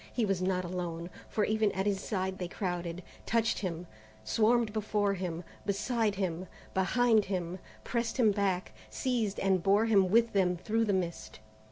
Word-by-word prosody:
He 235 - +1
was 195 -3 0
not 185 -1 0
alone, 175 -1 -4 0.2
for 215 - 0
even 215 -1 +2
at 190 +1 -1
his 200 -2 +1
side 190 -2 -2
they 180 - -2
crowded, 175 -1 -3 0.2
touched 230 -1 +2
him, 175 -3 -4 0.4
swarmed 225 - +2
before 210 -2 +1
him, 180 -3 -4 0.2
beside 210 +1 0
him, 185 -2 -2 0.3
behind 220 +3 +3
him, 185 -1 -3 0.2
pressed 235 0 -2
him 225 -5 +5
back, 195 -3 0 0.2
seized, 230 -6 -1
and 190 -2 +2
bore 200 +4 +4
him 200 -5 +4
with 230 +3 +4
them 180 -3 +2
through 225 +5 0
the 210 - +1
mist. 175 - -3
195 Hz, 165 wpm, -31 LUFS, 180-220 Hz, 0.4 s, him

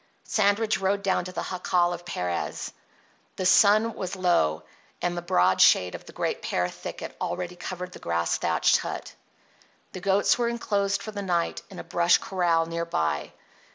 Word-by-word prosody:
Sandridge 215 +1 +1
rode 195 +1 0
down 190 -2 +1
to 185 - -6
the - - -4
jacal 180 -1 +1
of 175 0 -8
Perez. 90 - -3 0.6
The 185 - -3
sun 215 +4 +5
was 185 0 -5
low, 170 - +1 0.4
and 175 0 -1
the 175 - -3
broad 95 - +2
shade 90 -1 +5
of - - -8
the - - -10
great - - -2
pear 90 0 0
thicket - - -8
already 180 0 -3
covered 180 0 -6
the - - -11
grass 85 0 -1
thatched - - +3
hut. - - -6 0.8
The 185 - -8
goats 200 +4 +3
were 240 - +2
enclosed 200 -4 -1
for 215 - -6
the 205 -1 -5
night 175 -3 -1
in 190 - -11
a - - -6
brush 175 +1 +3
corral 175 -3 +1
near 170 0 -3
by. 80 - -2
180 Hz, 175 wpm, -26 LUFS, 170-200 Hz, 0.8 s, sun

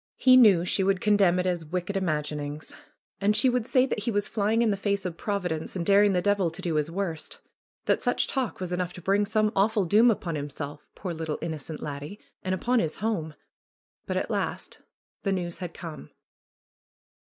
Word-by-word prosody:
He 255 -1 +6
knew 205 -9 +6
she 190 - +2
would 195 0 +2
condemn 200 -4 +3
it 180 - 0
as 180 -2 0
'Vicked 180 +5 -4
imaginings." 150 -4 -3 0.5
And 205 +1 +2
she 235 +5 +4
would 245 -2 0
say 260 -2 +4
that 260 - -2
he 210 - -2
was 205 -2 0
flying 220 +2 +1
in 225 - +2
the - - +1
face 200 0 -1
of 175 -3 -3
Providence 180 -5 -3
and 175 -2 -2
daring 200 +1 +5
the 180 -1 +1
devil 205 -4 +2
to 165 +3 -11
do 175 -3 -2
his 150 0 0
worst; 190 - -3 0.5
that - - +2
such - - +2
talk 260 -4 -2
was 180 -1 -3
enough 180 -1 -2
to 180 - -10
bring 200 +2 +2
some 215 -1 +2
awful 205 0 +2
doom 215 +7 +5
upon 190 -6 -1
himself 145 0 -6
— - - -49
poor, 180 -3 -5
little, 160 -2 -3
innocent 160 -1 -6
laddie! 145 +7 -6
— - - -48
and 185 0 0
upon 245 +6 +1
his 160 -7 -1
home. 190 -8 -2 0.7
But - - -1
at - - -2
last - - -3 0.4
the 195 - -1
news 175 -3 -3
had 180 -2 -5
come. 160 - -8
185 Hz, 205 wpm, -27 LUFS, 165-205 Hz, 0.7 s, He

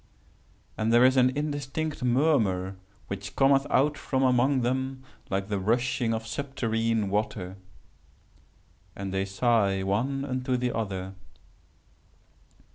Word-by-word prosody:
And 110 +1 +1
there 120 +2 +6
is 130 +1 +5
an 130 -1 +5
indistinct 145 +1 -3
murmur 120 - +2 0.3
which 100 -1 -6
cometh 135 0 +4
out 145 +2 +2
from 135 -1 -1
among 130 +1 +3
them 130 +2 -2 0.3
like 95 0 -1
the 105 -2 -1
rushing 120 +3 0
of 110 0 -2
subterrene 115 -4 -1
water. 95 -2 -2 1.4
And 95 -1 -5
they 95 0 0
sigh 100 -1 +1
one 130 +8 -1
unto 130 -1 -1
the 125 0 -1
other. 95 -4 -3
120 Hz, 120 wpm, -27 LUFS, 100-130 Hz, 1.4 s, there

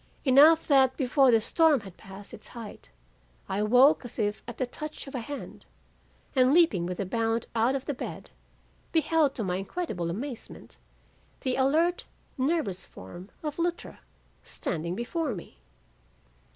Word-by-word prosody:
Enough 295 +5 +7
that 265 -3 +4
before 270 0 +3
the 225 -2 +5
storm 300 +4 +3
had 190 -3 -12
passed 195 +1 -12
its - - -10
height, 220 - -9 0.6
I 195 - -2
awoke 250 +8 +5
as 245 - -10
if 205 -1 -1
at 235 - -7
the 255 - 0
touch 305 +5 -7
of 275 - -10
a 255 - -2
hand, 280 +5 -8 0.7
and 260 +2 +4
leaping 220 - +4
with 180 0 -5
a 200 - -1
bound 225 +3 -1
out 230 +4 +2
of 270 - -4
the 290 - -2
bed, 255 - -7 0.6
beheld 320 -3 +2
to 225 - -2
my 180 -2 -1
incredible 195 - -3
amazement, 235 +7 -7 0.6
the 255 -1 -1
alert, 315 +7 +2 0.3
nervous 265 - -1
form 175 - -11
of 300 +1 -4
Luttra 345 0 -3 0.4
standing 170 +1 -4
before 260 - -2
me. 170 - -11
255 Hz, 150 wpm, -28 LUFS, 205-295 Hz, 0.7 s, Enough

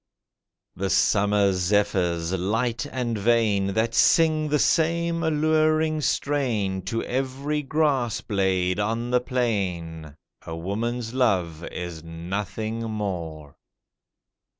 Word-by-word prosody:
The 95 +1 -2
summer 100 -1 +3
zephyrs, 90 -3 +1
light 115 +8 -1
and 120 -3 -2
vain, 105 -3 +2
That 115 +1 +1
sing 155 +2 +4
the 150 - +2
same 170 +2 +1
alluring 155 0 +2
strain 115 -12 0
To 115 +3 -2
every 135 +3 -2
grass 135 -6 0
blade 95 -2 0
on 115 +3 -1
the 125 0 +3
plain— 90 - -2 0.3
A 80 - -6
woman's 115 +7 -3
love 90 -11 +1
is 85 -3 -6
nothing 100 +7 -4
more. 85 -9 -4
110 Hz, 105 wpm, -25 LUFS, 95-130 Hz, 0.3 s, sing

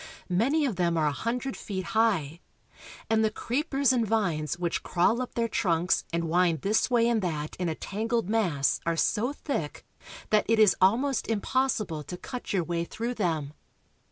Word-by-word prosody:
Many 270 - +2
of 230 -9 -2
them 170 -2 +1
are 155 - +2
a 150 - +2
hundred 245 - -3
feet 190 -3 -5
high, 185 -9 +1 0.7
and 220 0 +2
the 220 - +3
creepers 275 +3 0
and 240 -2 +2
vines 175 -9 0
which 175 -1 -2
crawl 205 +7 +1
up 255 - -6
their 235 -1 +1
trunks 180 -6 +1
and 170 0 -1
wind 170 0 +2
this 210 +5 +1
way 235 -2 +3
and 235 -2 +2
that 155 -4 -3
in 180 -2 -1
a 160 - -2
tangled 225 +3 -2
mass 185 -11 +1
are 165 0 -1
so 230 - +1
thick 275 - -4 0.5
that 210 -1 +4
it 225 - +4
is 210 -5 +6
almost 240 +8 +2
impossible 215 - 0
to 180 - -6
cut 250 +6 -7
your 190 -3 +1
way 170 0 -2
through 230 +7 -4
them. 160 -9 -2
205 Hz, 180 wpm, -27 LUFS, 170-235 Hz, 0.7 s, is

